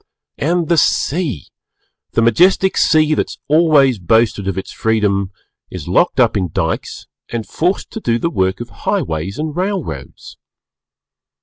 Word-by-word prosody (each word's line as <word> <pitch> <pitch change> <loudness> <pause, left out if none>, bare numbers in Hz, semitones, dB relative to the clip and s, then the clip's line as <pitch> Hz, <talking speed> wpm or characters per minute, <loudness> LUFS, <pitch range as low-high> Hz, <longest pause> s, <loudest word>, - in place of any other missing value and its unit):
And 170 +2 0
the 170 - +2
Sea! 145 - 0 0.7
The 115 - +2
majestic 185 - +3
Sea, 155 -1 +3
that - - -1
has - - -9
always 145 -6 +4
boasted 110 +1 +1
of 95 - -2
its 95 - -5
freedom, 105 -3 0 0.4
is - - -8
locked - - +2
up - - +3
in 95 -4 -1
Dykes - - -3 0.2
and 115 -2 -4
forced 180 +4 -1
to 225 - -5
do 115 - 0
the 170 +7 -2
work 95 - 0
of 120 - -7 0.2
highways 80 +5 -1
and 155 0 -4
railroads. 185 -1 -5
125 Hz, 145 wpm, -17 LUFS, 100-165 Hz, 0.7 s, always